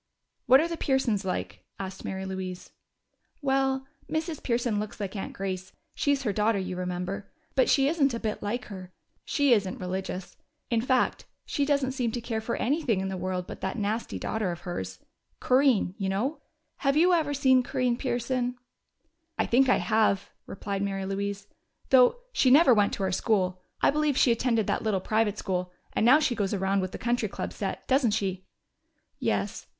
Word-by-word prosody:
"What 260 +2 +8
are 325 - +2
the 335 -1 -4
Pearsons 245 -9 +1
like?" 185 - -4
asked 190 -1 -6
Mary 190 0 -4
Louise. 190 -1 -6 0.7
"Well, 270 -1 +1 0.3
Mrs. 315 -1 -2
Pearson 235 -3 0
looks 210 0 -5
like 200 0 -4
Aunt 195 - -4
Grace 185 -1 -4 0.2
she's 285 -2 +1
her 210 -5 0
daughter, 210 +1 +2
you 185 -1 -3
remember 180 +2 -4 0.2
but 260 - +3
she 275 -1 +4
isn't 290 -3 +2
a - - -3
bit 215 -2 -3
like 235 +5 -3
her. 185 -3 -9 0.3
She 285 -4 +3
isn't 200 -4 0
religious; 185 0 -5 0.3
in 230 -1 +2
fact, 255 +1 +1 0.2
she 285 - 0
doesn't 280 -2 +1
seem 250 -3 -1
to 245 - -2
care 225 -1 -3
for 235 +2 -2
anything 265 - +1
in 190 0 -2
the 190 - -3
world 185 0 -3
but - - -9
that 190 +5 -2
nasty 215 +2 -2
daughter 215 -5 -2
of 170 - -7
hers. 95 - -5 0.4
Corinne, 255 -8 +3
you 195 -1 -1
know. 240 +11 -1 0.4
Have 275 0 +1
you 355 +3 +5
ever 305 -4 +1
seen 260 -2 +4
Corinne 250 0 0
Pearson?" 245 0 -1 0.8
"I - - +2
think 260 +2 +4
I - - +5
have," 200 +1 +1 0.2
replied 200 0 -4
Mary 195 -1 -2
Louise. 200 +1 -3 0.5
"Though 260 - +6
she 265 - +4
never 275 0 +7
went 205 -2 +3
to 195 - -2
our 190 - 0
school. 185 -3 0 0.2
I - - +5
believe 300 -2 +1
she 245 - +5
attended 230 -2 +1
that - - 0
little 215 -3 0
private 215 +1 0
school, 180 -3 -2 0.2
and - - +1
now 255 +6 +7
she 290 -5 +1
goes 205 -3 -1
around 195 +1 +1
with 185 0 -3
the - - -6
Country 240 +1 0
Club - - -5
set, - - -4
doesn't 260 -5 +3
she?" 190 -2 -3 0.7
"Yes. - - -1
220 Hz, 185 wpm, -27 LUFS, 190-260 Hz, 0.8 s, What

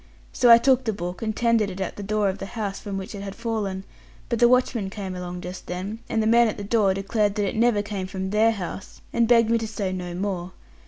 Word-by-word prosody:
So 245 - +4
I 230 - +11
took 260 +1 +3
the 220 - 0
book, 180 -2 -5
and 220 -1 -2
tendered 230 -3 +2
it 190 0 -7
at 190 - -3
the - - -7
door 210 0 0
of 190 +1 -2
the 195 - -5
house 200 -3 -3
from 200 -2 -5
which 190 +2 -6
it 200 - -6
had 200 -1 -6
fallen; 215 -5 -3 0.5
but 235 - 0
the 240 - +7
watchman 245 -5 +2
came 195 -2 -6
along 180 0 -6
just 180 +1 -8
then, 190 +5 -4
and 220 - +1
the - - -1
man 235 +1 +5
at 215 - -3
the 205 - -5
door 200 -2 +2
declared 205 +1 0
that 205 -2 0
it - - -3
never 225 -2 +3
came 200 -3 -4
from 190 0 -4
their 215 +2 +4
house, 190 -1 -7
and 235 -1 +3
begged 230 -1 +4
me 230 - +3
to 225 - -3
say 205 -3 -3
no 180 -1 -5
more. 185 -1 -3
205 Hz, 260 wpm, -24 LUFS, 190-225 Hz, 0.5 s, I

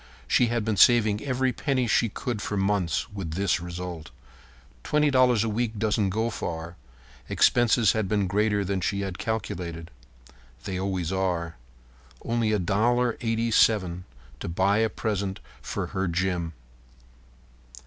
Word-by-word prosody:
She 125 - +3
had 115 -2 -1
been 110 -2 0
saving 110 -3 +5
every 130 -1 0
penny 130 0 0
she 115 0 +2
could 110 +1 -4
for 105 - -3
months, 95 -5 0
with 95 -6 -5
this 100 -1 +1
result. 85 -2 -6 0.7
Twenty 150 -1 +2
dollars 125 -4 +4
a - - -1
week 110 0 -2
doesn't 105 -2 +1
go 110 +4 -1
far. 85 -3 -5 0.5
Expenses 120 -3 +4
had 110 -3 -1
been 105 -2 +1
greater 105 +1 +1
than 95 0 -1
she 100 +2 -1
had 95 -2 -5
calculated. 85 -7 -4 0.7
They 95 -2 -4
always 95 -3 -2
are. 90 -3 -1 0.7
Only 115 -1 0
$1.87 110 -2 +1 0.4
to - - -5
buy 95 +4 +2
a 110 0 +2
present 100 -3 -3 0.2
for - - -3
Jim. - - -11
Her 95 0 -1
Jim. 85 -1 -1
100 Hz, 140 wpm, -26 LUFS, 90-115 Hz, 0.7 s, saving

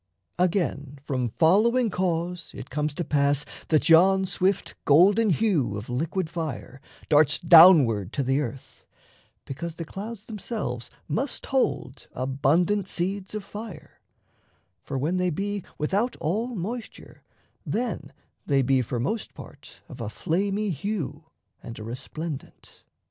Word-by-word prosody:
Again, 165 -6 0
from 130 -4 -1
following 215 - +3
cause 175 -1 -2
it 130 -1 -9
comes 150 +1 -2
to 175 - -2
pass 145 -1 +1 0.2
That 155 -2 +2
yon 190 +4 +6
swift 185 +1 0
golden 200 +9 +5
hue 170 - +1
of 105 +4 -8
liquid 165 +7 -1
fire 150 -5 -6 0.3
Darts 150 0 +5
downward 160 - +7
to 140 - 0
the 135 +3 +1
earth: 130 -1 -8 0.6
because 160 +4 -6
the 165 - -6
clouds 210 +5 -7
Themselves 210 - -5 0.2
must 250 - -2
hold 145 - -1
abundant 150 +10 +1
seeds 195 +3 -2
of 210 - -4
fire; 205 -4 -10 0.8
For, 135 - -5
when 155 +8 0
they 180 0 +1
be 200 +3 -3
without 200 +11 0
all 220 +10 -2
moisture, 220 +5 -7 0.4
then 240 +1 -3 0.3
They 140 -2 +2
be 130 +1 +3
for 120 0 -3
most 215 - -3
part - - -13
of - - -10
a 110 - -3
flamy 200 - -1
hue 160 -2 -4 0.4
And 115 - -9
a 110 - -7
resplendent. 140 +6 -7
165 Hz, 130 wpm, -25 LUFS, 140-200 Hz, 0.8 s, downward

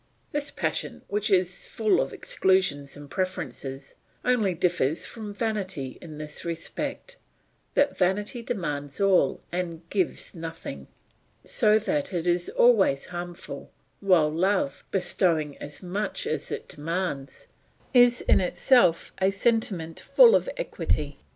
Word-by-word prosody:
This 290 0 -1
passion - - -3
which 210 +2 0
is 180 -2 +1
full 220 -2 +2
of - - -2
exclusions 180 -8 0
and 145 0 -10
preferences, 140 -4 -4 0.3
only 220 -8 +2
differs 165 -3 +1
from 220 -3 -7
vanity 195 - -3
in 155 -3 -9
this 150 0 -6
respect, 170 - -4 0.6
that 285 - +3
vanity 205 +6 0
demands 150 - -4
all 195 -2 +3
and 170 -2 -4
gives 190 -4 -1
nothing, 165 - -7 0.6
so 215 0 +4
that 285 +2 -1
it 170 -2 -1
is 175 0 +1
always 200 - +4
harmful, 175 0 -6 0.3
while 180 -6 +4
love, 185 -2 0
bestowing 170 -5 +1
as 145 +5 -8
much 195 +3 -3
as 150 -1 -3
it - - -4
demands, 155 -3 -4 0.5
is 245 -1 +6
in - - +4
itself 180 -1 +3
a 190 - +5
sentiment 195 -5 0
full 485 -2 +6
of - - +3
equity. 150 - -2
180 Hz, 125 wpm, -26 LUFS, 155-210 Hz, 0.6 s, is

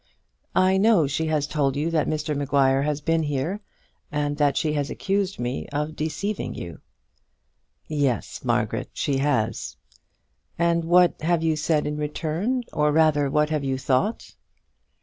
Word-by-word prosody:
"I 185 +1 +4
know 200 -5 +4
she 145 +4 -1
has 155 -2 +1
told 145 -3 0
you 155 +4 -1
that 160 -2 +1
Mr 155 -1 -1
Maguire 140 -1 +2
has 150 0 -1
been 165 +2 +1
here, 155 +7 -2 0.5
and 145 -1 -1
that 145 -2 +2
she 155 -1 0
has 145 -1 -1
accused 195 0 -1
me 120 +2 -3
of 150 +2 -3
deceiving 190 +7 -3
you." 85 -4 -7 1.1
"Yes, 140 -6 -1
Margaret, - - -1
she 140 -2 -1
has." 115 -6 -1 0.8
"And 170 0 +1
what 175 +1 +4
have 165 +1 +1
you 160 -1 +2
said 150 0 +1
in 150 0 -2
return; 165 - -2
or 150 0 +2
rather, 150 -2 +3
what 150 +2 +1
have 150 -2 0
you 135 -1 -1
thought?" 135 - -1
150 Hz, 150 wpm, -24 LUFS, 145-165 Hz, 1.1 s, I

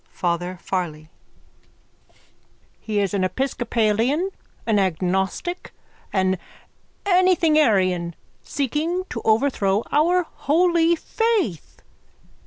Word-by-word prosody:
_ - - -42
FATHER 175 +1 -2
FARLEY: 155 -5 -3 1.7
He 215 -2 -2
is 200 -1 0
an 195 -2 +1
episcopalian, 240 - 0 0.3
an 220 -3 +2
agnostic, 190 - -1 0.4
an 190 -1 +1 0.7
anythingarian 305 - +3 0.3
seeking 305 +7 -2
to 230 - -4
overthrow 220 -3 +2
our 350 +5 +3
holy 340 +2 +2
faith. 400 - -2
225 Hz, 80 wpm, -22 LUFS, -, 1.7 s, anythingarian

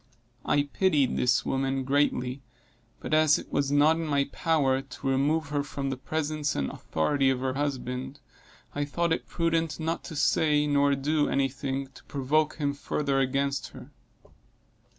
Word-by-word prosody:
I 145 -1 +2
pitied 145 -2 +1
this 125 0 +2
woman 135 0 -1
greatly, 135 -1 0 0.6
but - - -5
as 155 -1 +5
it - - -10
was 140 -1 0
not 150 +3 +4
in 165 -1 -3
my 140 -2 +2
power 140 -5 +1
to 135 - -8
remove 140 +3 +1
her 145 0 0
from 140 -1 -4
the - - -2
presence 150 +2 -2
and 70 -1 -1
authority 135 - 0
of 130 -1 0
her 130 0 -1
husband, 130 -1 -3 0.5
I 145 - -1
thought 165 +3 0
it - - -4
prudent 165 -2 -1
not 165 +1 -2
to 160 - -7
say 150 0 +2
nor 145 -1 +3
do 145 +2 +1
any 135 0 +1
thing 135 0 -4
to - - -15
provoke 150 +3 0
him 145 -2 -1
further 140 -1 -1
against 140 +1 0
her. 135 - -12
140 Hz, 165 wpm, -27 LUFS, 135-150 Hz, 0.6 s, as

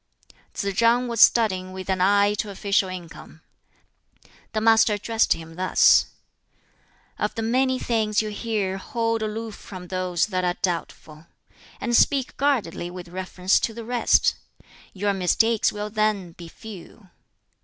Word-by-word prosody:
Tsz 200 0 -2
chang 235 +2 +3
was 230 -2 -1
studying 185 -5 +4
with 190 0 -8
an 190 -1 -1
eye 200 +2 +4
to 210 - -2
official 200 -1 0
income. 170 -3 -10 1.1
The 215 - 0
Master 220 -1 +4
addressed 225 +2 +1
him 165 0 -11
thus: 185 0 +4 1.1
"Of - - -2
the 225 - -3
many 260 +3 +1
things 220 -4 0
you 215 - -1
hear 205 -3 -3
hold 230 +2 -2
aloof 220 +1 -4
from 185 -3 -11
those 185 -2 0
that 185 0 0
are 180 0 -1
doubtful, 165 -3 -4 0.5
and 240 -1 -1
speak 270 +1 +2
guardedly 245 -12 -1
with 180 -1 -9
reference 185 +1 0
to 225 - -3
the 230 -1 -7
rest; 245 0 +2 0.6
your 200 +1 -1
mistakes 215 +4 +2
will 210 0 -5
then 215 -4 0
be 170 0 -12
few. 195 +1 -12
205 Hz, 145 wpm, -24 LUFS, 185-225 Hz, 1.1 s, studying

